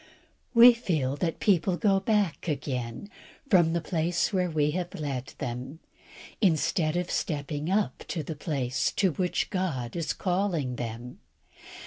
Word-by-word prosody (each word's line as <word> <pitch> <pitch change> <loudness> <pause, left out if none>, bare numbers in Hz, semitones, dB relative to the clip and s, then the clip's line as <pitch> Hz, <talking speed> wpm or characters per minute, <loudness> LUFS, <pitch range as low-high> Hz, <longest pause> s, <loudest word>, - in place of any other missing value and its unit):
We 240 +1 +10
feel 155 - -1
that 165 +1 -2
people 185 -3 +2
go 195 +3 +3
back 205 -6 0
again 130 - -3 0.4
from 170 -4 +5
the 170 - 0
place 170 +3 0
where 180 -2 +1
we 150 -2 +1
have 175 +2 -4
led 140 -3 -4
them, 125 +4 -5 0.6
instead 165 -2 +2
of 180 0 -2
stepping 145 +1 -2
up 205 +2 0
to 160 - -3
the 160 - -5
place 135 -4 -1
to 190 -3 +2
which 180 +6 -1
God 155 - -2
is 165 -2 -1
calling 175 -9 -1
them. 120 +1 -6
165 Hz, 140 wpm, -28 LUFS, 140-185 Hz, 0.6 s, We